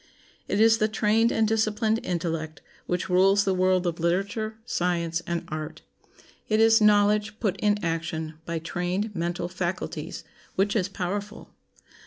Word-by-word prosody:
It 200 - 0
is 225 0 +5
the 215 - +3
trained 220 +2 +2
and 220 -1 +2
disciplined 220 0 +1
intellect 165 -3 -3 0.2
which 180 0 -1
rules 195 +2 +4
the 195 - +1
world 185 0 +2
of 170 -1 -2
literature, 200 +6 -1
science, 170 -6 -1
and 170 -1 -2
art. 155 0 -6 0.7
It 215 0 +2
is 225 0 +5
knowledge 210 0 +3
put 205 -5 0
in 210 -1 +2
action 165 -1 -3
by 170 -1 -2
trained 180 +6 -3
mental 175 0 -2
faculties 180 0 -4 0.3
which 200 +2 +1
is 200 -3 +1
powerful. 200 +3 -5
190 Hz, 145 wpm, -26 LUFS, 170-210 Hz, 0.7 s, is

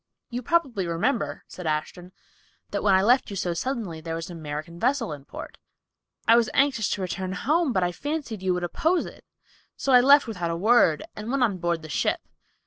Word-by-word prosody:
"You 245 +1 -3
probably 250 - 0
remember," 155 -3 -1
said 180 -3 -7
Ashton, 155 +4 -3 0.6
"that - - -1
when 200 -2 +4
I 190 - +4
left 245 +5 +3
you 200 - -6
so 180 -2 -1
suddenly 200 -5 -3
there 165 0 -4
was 165 +2 -6
an 170 - -8
American 155 +3 -6
vessel 245 - 0
in 140 -2 -10
port. - - -9 0.7
I 230 - +7
was 235 0 +3
anxious 270 -6 +2
to 195 - -3
return 185 0 -3
home, 300 - +1
but 185 -5 +1
fancied 290 - -4
you 185 -1 +1
would 180 - -3
oppose 325 - +1
it, - - -11 0.5
so 270 - 0
I 250 - +8
left 280 +3 +6
without 180 -8 -3
a 165 - -1
word, 200 -5 +4
and 215 +2 -6
went 270 0 +1
on 200 -6 +1
board 170 -2 -1
the - - -7
ship. 125 -7 0
190 Hz, 205 wpm, -25 LUFS, 170-250 Hz, 0.7 s, I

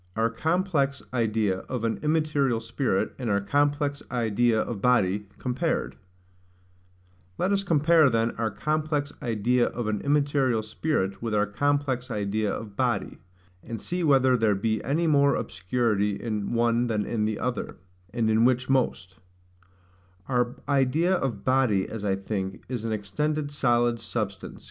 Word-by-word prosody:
Our 115 +1 +1
complex 155 -1 0
idea 110 -5 +1
of 125 -3 -3
an 115 -1 -1
immaterial 150 -6 +1
Spirit 115 -2 -1
and 125 -3 -2
our 100 -1 +2
complex 145 +6 0
idea 115 -1 +1
of 110 -3 -3
Body 105 -5 +2
compared. 135 +6 -2 1.4
Let 190 - 0
us 200 0 +1
compare, 160 -3 +4
then, 115 -1 +1
our 115 -1 -2
complex 150 +4 -1
idea 120 +2 +1
of 120 -1 -4
an 105 -1 -1
immaterial 140 -5 +1
spirit 110 -3 -2
with 115 -2 -2
our 105 0 +3
complex 135 +3 -1
idea 105 -1 -1
of 105 -1 -6
body, - - -1 0.4
and 115 -1 -6
see 180 0 -3
whether 130 -4 +4
there 110 -4 +2
be 110 +2 -1
any 155 +7 0
more 140 -3 +4
obscurity 105 +2 0
in 105 -3 -3
one 120 0 +2
than 105 -3 -1
in 110 -2 -1
the 110 -1 -1
other, 125 -1 -3 0.3
and 115 -2 0
in 110 +1 +3
which 125 +1 +2
most. 100 -8 0
120 Hz, 120 wpm, -26 LUFS, 110-145 Hz, 1.4 s, compare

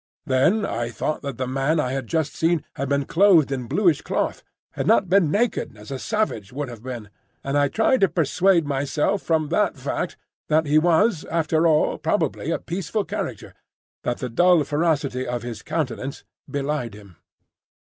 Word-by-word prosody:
Then 155 +10 +2
I 115 0 -2
thought 155 +5 -3
that 140 -4 -5
the 130 - -2
man 135 +5 0
I 130 -4 0
had 135 -2 -3
just 160 0 -1
seen 165 -1 +1
had 140 0 -4
been 140 -1 +1
clothed 170 -5 +4
in 130 -3 -3
bluish 175 - +2
cloth, - - -2 0.3
had - - -3
not 185 - +4
been 185 -4 +4
naked 205 - 0
as 105 +5 -11
a 135 - -4
savage 210 - -2
would 140 +1 -4
have 115 -3 -10
been; 120 -5 -7 0.3
and 140 +1 -2
I 145 0 +4
tried 225 - +2
to 195 - +6
persuade 175 +1 +2
myself 145 +7 0
from 155 -2 0
that - - +1
fact - - -3 0.3
that 155 +1 +2
he 150 +1 +4
was 175 +3 +3
after 165 0 +1
all 155 -1 +2
probably - - -1
a - - +1
peaceful 195 +4 -3
character, - - -5 0.5
that 120 - -2
the 125 - -4
dull 175 +6 +4
ferocity 145 -4 0
of 120 -1 -3
his 115 -3 -6
countenance 140 -3 -3 0.3
belied 140 -6 -2
him. 100 -5 -15
150 Hz, 180 wpm, -23 LUFS, 130-170 Hz, 0.5 s, to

